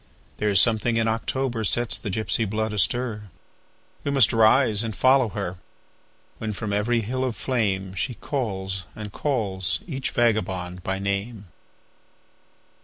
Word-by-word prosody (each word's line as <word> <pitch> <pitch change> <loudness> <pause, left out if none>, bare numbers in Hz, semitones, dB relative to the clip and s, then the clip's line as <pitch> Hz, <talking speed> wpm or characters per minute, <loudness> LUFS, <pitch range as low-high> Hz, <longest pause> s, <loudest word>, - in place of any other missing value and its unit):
There 105 - 0
is 100 -2 +6
something 115 +2 +5
in 115 0 +1
October 115 +1 -1
sets 120 +4 +1
the 105 - -5
gypsy 110 +1 0
blood 110 +1 -2
astir; 105 +1 -1 0.7
We - - -2
must 135 -6 +5
rise 110 -1 +4
and 110 -2 -4
follow 130 -2 +4
her, 95 -3 -4 0.8
When 110 -1 -3
from 105 0 -4
every 115 +3 +1
hill 130 +4 -2
of 125 -3 -2
flameShe 100 -2 -1
calls 95 -8 -3
and 105 -2 -7
calls 95 -11 -1
each 135 -6 -4
vagabond 95 -6 0
by 95 +2 -2
name. 100 +1 -3
110 Hz, 135 wpm, -24 LUFS, 100-120 Hz, 0.8 s, is